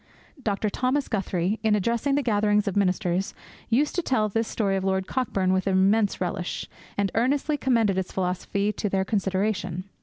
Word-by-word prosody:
Dr. 210 -2 -1
Thomas 265 +5 0
Guthrie, 195 -1 -1
in 220 -1 +3
addressing 235 +7 +1
gatherings 210 -6 +2
of 200 - -1
ministers, 185 -1 0 0.3
used 275 +6 +2
to 355 - 0
tell 220 -9 +1
this 225 +2 -1
story 200 -3 0
of 190 - -1
Lord 190 0 0
Cockburn 195 -7 0
with 190 +1 0
immense 195 +2 +3
relish, 180 0 -3 0.3
and 200 -1 +1
earnestly 275 +6 +1
commended 230 -8 +2
its 185 - -4
philosophy 195 +3 -1
to 210 - -2
their 190 0 0
consideration. 190 -3 -1
205 Hz, 160 wpm, -25 LUFS, 190-225 Hz, 0.3 s, in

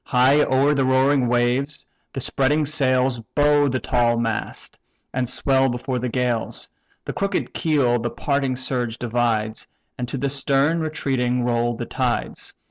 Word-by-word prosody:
High 130 +4 +4
o'er 140 +1 +3
the 140 -2 +1
roaring 130 0 +3
waves 125 +4 0 0.3
the 135 - -4
spreading 145 +4 +1
sails 130 -4 +1 0.2
Bow 145 0 +4
the 130 -1 -1
tall 120 -2 +1
mast, 115 -2 -4 0.3
and 125 -1 -1
swell 135 +1 +2
before 125 +1 -3
the 125 +1 -2
gales; 120 -2 -2 0.4
The - - -4
crooked 200 -1 -2
keel 140 -8 +1
the 120 +1 -2
parting 140 0 -1
surge 125 -2 -2
divides, 115 -2 -1 0.3
And 125 - -2
to 135 - -4
the 140 +2 -1
stern 140 +3 +2
retreating 130 -6 -1
roll 120 0 0
the - - -5
tides. - - -2
130 Hz, 150 wpm, -22 LUFS, 120-140 Hz, 0.4 s, High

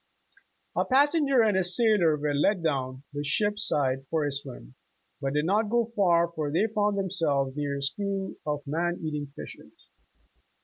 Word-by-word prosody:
' 400 - -32
' - - -45
A - - +2
passenger 275 -1 +3
and 210 -3 +2
a 190 - +3
sailor 180 -4 +3
were 145 0 -1
let 170 +6 +1
down 130 -4 -2
the 145 0 -3
ship's 205 +7 0
side 135 -2 0
for 160 -2 0
a 145 - -1
swim, 130 - -8 0.5
but 135 0 -1
did 150 +1 +1
not 210 +4 +1
go 235 +1 +2
far, 180 -7 +2
for 155 -3 -3
they 170 +8 +2
found 210 -2 0
themselves 155 -9 0
near 145 -1 -2
a 140 - -4
school 195 +5 -2
of 150 -1 -3
man 170 +4 -1
eating 150 -2 -3
fishes. - - -12
170 Hz, 180 wpm, -27 LUFS, 145-205 Hz, 0.5 s, passenger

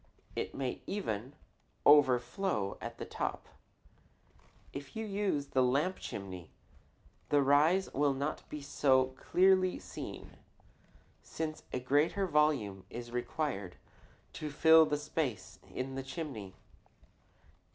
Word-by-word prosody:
It - - -3
may 130 -2 -3
even 130 - -3 0.5
overflow 130 - +4
at - - -6
the - - -5
top. - - -4 1.3
If 140 -1 -8
you 220 0 -3
use 195 -9 -1
the 130 - +2
lamp 145 +9 +1
chimney 95 -4 -7 0.8
the 145 -1 +4
rise 155 +7 +3
will 140 -1 +2
not 140 +3 -2
be 150 -1 -6
so 130 -2 +2
clearly 185 +2 +3
seen, 90 -1 -8 0.8
since 155 -1 -5
a - - -1
greater 145 +10 +2
volume 145 - +1
is 120 0 -7
required 120 - -3 0.6
to 155 - -5
fill 160 +2 +6
the 150 - 0
space 145 - -3
in 130 +1 -4
the 135 - -3
chimney. 135 - -6
140 Hz, 115 wpm, -33 LUFS, 125-160 Hz, 1.3 s, fill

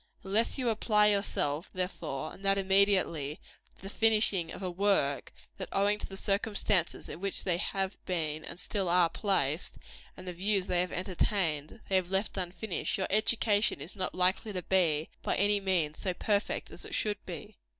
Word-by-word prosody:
Unless 210 +7 0
you 255 -3 0
apply 210 -1 +4
yourself, 175 -6 0
therefore 155 -5 -3
and 195 - -14
that 195 0 +3
immediately 190 -6 +2 0.4
to - - -19
the - - -6
finishing 210 -6 +2
of 190 - -7
a 185 - -2
work, 175 -8 +1 0.3
that, - - -6
owing 205 +1 +2
to - - -6
the 195 - -8
circumstances 200 -3 +1
in 170 - -8
which 195 -1 -1
they 175 -3 +1
have 190 +2 -3
been 155 -4 -1
and - - -6
still 190 0 -1
are 175 -1 +4
placed, 170 -7 0 0.4
and 185 - -10
the 180 - -3
views 195 +2 0
they 180 -2 +1
have 180 - -2
entertained, 180 -2 -1
they 190 - +3
have 180 -1 -1
left 195 +2 0
unfinished, 185 +1 -3
your 190 - 0
education 215 0 +2
is - - -8
not 185 -2 -2
likely 185 +4 +2
to 180 -3 -4
be, 165 -5 +2
by - - 0
any 205 +1 +3
means, 175 -6 0
so 185 -2 -1
perfect 205 +1 -1
as - - -10
it - - -5
should 210 -1 -1
be. 170 -5 -8
190 Hz, 180 wpm, -30 LUFS, 175-205 Hz, 0.4 s, apply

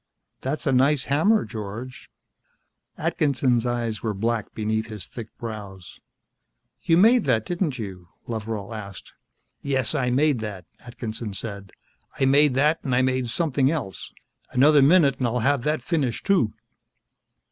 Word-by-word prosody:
"That's 140 +4 -3
a 135 - +2
nice 135 +2 +3
hammer, 165 - +2
George." 110 +3 -7 0.9
Atkinson's 130 -4 +1
eyes 120 -3 -2
were 110 -3 -2
black 115 +1 -1
beneath 110 +1 -1
his 105 -3 -7
thick 115 -3 -8
brows. 100 -6 -8 0.8
"You 165 - +3
made 225 +4 +5
that, 115 -5 +1
didn't 175 -6 -2
you?" 95 -6 -7 0.2
Loveral 110 -2 -4
asked. 100 -3 -9 0.5
"Yes, 135 -4 -1
I 125 -1 0
made 140 +1 +2
that," 105 -5 -6
Atkinson 115 -3 -6
said. 100 -3 -6 0.5
"I 135 - +3
made 140 0 +4
that 150 +4 +2
and 130 -3 0
I 130 - +3
made 130 -1 0
something 140 -2 +1
else. 145 -12 -4 0.4
Another 145 +3 +5
minute 140 -2 +5
and 125 - +1
I'll 120 +1 -1
have 140 +2 +2
that 150 -4 0
finished, 135 -6 -1
too." 185 - +3
125 Hz, 145 wpm, -24 LUFS, 110-140 Hz, 0.9 s, made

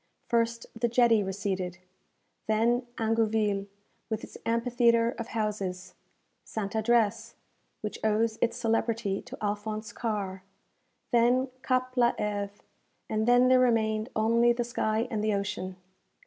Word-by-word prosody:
First 230 -1 0
the 235 +1 +1
jetty 235 -2 +4
receded; 190 -2 -3 0.7
then 235 +3 +2
Ingouville, 220 -3 +1 0.4
with 220 -1 -3
its - - -10
amphitheatre 235 0 +3
of 230 - -4
houses; 200 -4 -3 0.5
Ste. 200 -3 -4
Addresse, 220 -1 +1 0.5
which 210 - -5
owes 220 +1 +1
its 235 - +1
celebrity 225 -3 0
to 250 +2 -10
Alphonse 215 +2 -3
Karr; 200 -4 -3 0.7
then 245 +2 +3
Cape 255 -1 0
la 240 -1 +4
Hêve; 205 -1 -2 0.6
and 220 +1 0
then 245 +1 +6
there 255 0 +6
remained 220 -2 +2
only 230 +2 +4
the 240 0 -1
sky 230 -1 -1
and 215 -2 -1
the 215 -1 +2
ocean. 200 -2 -3
225 Hz, 125 wpm, -28 LUFS, 210-235 Hz, 0.7 s, then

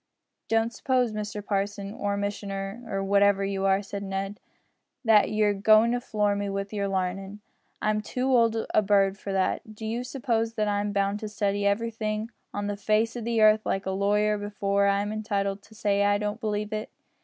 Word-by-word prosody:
"Don't 225 +1 +1
suppose, 250 -1 +1
Mr 210 -1 -5
parson, 200 0 -2
or 205 -2 -2
missioner, 200 +1 -4
or 195 -1 -1
whatever 200 0 +3
you 195 0 -2
are," 195 +1 +2
said 200 0 -6
Ned, 195 +1 -4 0.7
"that 220 -2 +5
you're 210 -1 +2
goin' 215 +3 +5
to 245 0 0
floor 210 -4 0
me 200 0 -2
wi' 195 0 -2
your 200 -2 -1
larnin'. 195 +1 -3 0.4
I'm 215 0 +1
too 250 +4 -3
old 230 -1 +3 0.2
a - - +5
bird 200 -1 +2
for 200 - -5
that. 195 +3 -1
Do 220 - -7
you 230 +3 -2
suppose 230 -3 -1
that 215 -1 0
I'm 205 0 0
bound 200 0 0
to 215 - -5
study 205 -1 0
everything 220 +1 -1 0.2
on 205 0 -3
the 205 0 -2
face 220 +3 +1
o' 240 - -4
the 230 0 0
earth 215 0 +6
like 195 0 -1
a 190 - -1
lawyer 205 +2 +1
before 200 -1 0
I'm 200 +1 +1
entitled 200 -2 -2
to 205 +2 -18
say 200 -1 +1
I 205 0 +3
don't 210 +2 -3
believe 210 -1 -2
it. 215 0 -3
205 Hz, 190 wpm, -27 LUFS, 200-215 Hz, 0.7 s, earth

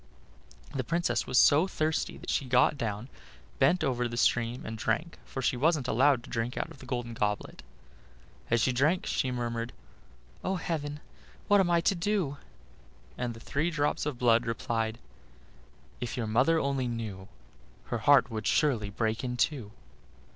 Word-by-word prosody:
The 130 - -1
Princess 145 -5 0
was 125 - +1
so 150 +9 +6
thirsty 155 -3 -1
that - - -5
she 140 - 0
got 125 +4 +4
down, 110 -2 -3 0.5
bent 180 -2 +4
over 125 -4 0
the 120 0 -6
stream, 120 +1 +1
and 110 - -5
drank, 115 +10 -2
for 135 - -5
she 125 - +2
wasn't 145 0 +2
allowed 130 +1 +3
to - - -12
drink 115 +1 -2
out - - -3
of - - -13
the 130 - -12
golden 120 -1 -3
goblet. 105 -2 -2 0.9
As 120 - +3
she 130 - +3
drank 150 +9 +2
she 130 - 0
murmured: 120 -1 -3 0.7
"Oh! 190 - 0
heaven, 150 -4 -3 0.5
what 205 -1 +5
am 185 -2 +3
I 170 -1 +3
to 180 - +3
do?" 175 -5 -1 0.8
and 120 -2 -3
the - - -10
three 150 +8 -1
drops 150 -2 0
of 145 -4 -3
blood 120 -1 +3
replied: 115 -1 -1 1.0
"If 120 - -4
your 120 - -1
mother 125 +10 +3
only 135 -3 0
knew, 110 -5 -5 0.7
Her 120 - 0
heart 140 0 +5
would 110 -1 -3
surely 120 -9 +2
break 110 +2 -1
in 125 -1 -3
two." 125 -7 0
125 Hz, 170 wpm, -29 LUFS, 115-150 Hz, 1.0 s, so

